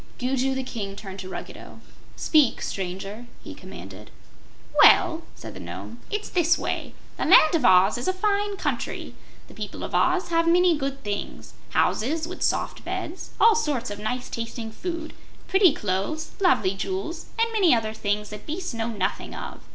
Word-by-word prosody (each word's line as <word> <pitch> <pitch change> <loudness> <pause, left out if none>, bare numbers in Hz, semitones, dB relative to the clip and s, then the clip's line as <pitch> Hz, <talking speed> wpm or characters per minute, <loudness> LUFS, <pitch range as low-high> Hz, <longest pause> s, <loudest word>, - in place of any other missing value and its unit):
Gugu 265 +1 0
the 265 - -2
King 205 -6 -5
turned 195 -1 -8
to 185 0 -7
Ruggedo. - - -8 0.4
"Speak, 300 -6 +3
Stranger," 195 +5 -5 0.2
he - - -8
commanded. - - -11 0.7
"Well," 340 -3 +6
said - - -9
the - - -9
Nome, 235 - -8
"it's 420 0 -3
this 345 -1 +3
way: - - -3 0.2
The - - -1
Land 315 - +7
of 325 -5 +2
Oz 185 +3 +5
is 245 - -3
a - - +4
fine 405 +1 0
country. - - -3 0.3
The - - -14
people - - -6
of - - -6
Oz 365 +1 +2
have 330 0 +2
many 350 0 +5
good 275 -1 -4
things 205 -1 -5 0.2
houses 310 +8 +1
with 365 - -8
soft - - 0
beds, 335 +4 -5
all 455 - +7
sorts 280 - -1
of 205 - -6
nice 245 +4 -3
tasting 230 -1 -5
food, 335 +5 -5 0.3
pretty 385 -3 +6
clothes, 210 +11 -2
lovely 250 - +3
jewels, 195 - -4
and 455 0 +1
many 380 - +5
other 220 -1 -1
things 210 -1 -2
that 210 - -9
beasts 350 0 -4
know 225 0 -2
nothing 200 -3 -3
of. - - -7
265 Hz, 170 wpm, -25 LUFS, 210-345 Hz, 0.7 s, Land